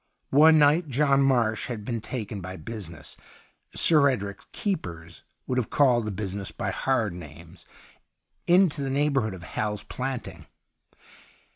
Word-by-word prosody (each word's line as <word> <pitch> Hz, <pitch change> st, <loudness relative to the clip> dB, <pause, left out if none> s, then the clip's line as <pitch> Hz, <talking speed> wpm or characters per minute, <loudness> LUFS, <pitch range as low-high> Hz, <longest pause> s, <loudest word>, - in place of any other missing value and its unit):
One 155 Hz, +3 st, +7 dB
night 150 Hz, +2 st, +4 dB
John 140 Hz, +1 st, +3 dB
Marsh 120 Hz, -5 st, +2 dB
had 110 Hz, -4 st, -6 dB
been 115 Hz, -2 st, -3 dB
taken 105 Hz, -4 st, -5 dB
by 95 Hz, +1 st, -7 dB
business 90 Hz, -, -9 dB, 0.3 s
— -, -, -34 dB, 0.3 s
Sir 150 Hz, -4 st, +5 dB
Edric's 100 Hz, -6 st, -4 dB
keepers 85 Hz, -, -4 dB, 0.2 s
would 130 Hz, 0 st, 0 dB
have 120 Hz, -, -3 dB
called 125 Hz, -5 st, +3 dB
the 105 Hz, -, -3 dB
busi 100 Hz, -1 st, -4 dB
ness 100 Hz, -1 st, -5 dB
hj -, -, -3 dB
hard 115 Hz, -8 st, 0 dB
names 85 Hz, +1 st, -12 dB, 0.4 s
— -, -, -50 dB
into 180 Hz, -6 st, +3 dB
the 135 Hz, -, -2 dB
neigh 145 Hz, +2 st, +1 dB
bourhood 110 Hz, -8 st, 0 dB
ot 90 Hz, -, -11 dB
Hal's 105 Hz, +3 st, -3 dB
Planting. 130 Hz, -1 st, -6 dB
115 Hz, 155 wpm, -26 LUFS, 100-140 Hz, 0.4 s, One